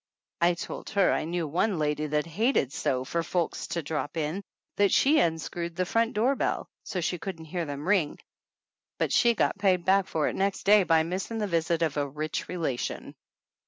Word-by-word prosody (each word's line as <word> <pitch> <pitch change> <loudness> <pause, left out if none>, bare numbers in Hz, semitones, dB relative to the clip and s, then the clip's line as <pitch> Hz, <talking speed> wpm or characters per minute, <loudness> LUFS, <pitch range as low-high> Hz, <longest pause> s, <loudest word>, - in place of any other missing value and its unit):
I 175 0 +4
told 170 - -6
her 195 - +5
I - - -1
knew 170 0 -2
one 180 +6 0
lady 150 0 0
that 150 0 0
hated 170 - +1
so 130 -1 0
for 170 +5 -1
folks 170 0 -2
to 170 - -3
drop 150 +1 -3
in 160 +5 -2 0.4
that 200 -1 +4
she 300 +3 +4
unscrewed 170 +1 -1
the 185 +1 0
front 230 +5 +1
doorbell, 255 +6 +1 0.2
so 185 - -3
she 175 +1 -1
couldn't 165 -4 -6
hear 170 +2 -3
them 145 +2 -6
ring, 185 -7 +2 0.8
but - - 0
she 235 -1 +4
got 200 - +1
paid 185 -4 +2
back 195 0 +3
for 155 -4 0
it - - -2
next 195 0 -1
day 210 +1 +6
by 165 -3 +3
missing 190 +7 -3
the 215 - 0
visit 170 -2 0
of 155 -3 -1
a 145 -1 0
rich 155 +2 -4
relation. 160 -9 -3
170 Hz, 195 wpm, -28 LUFS, 155-195 Hz, 0.8 s, day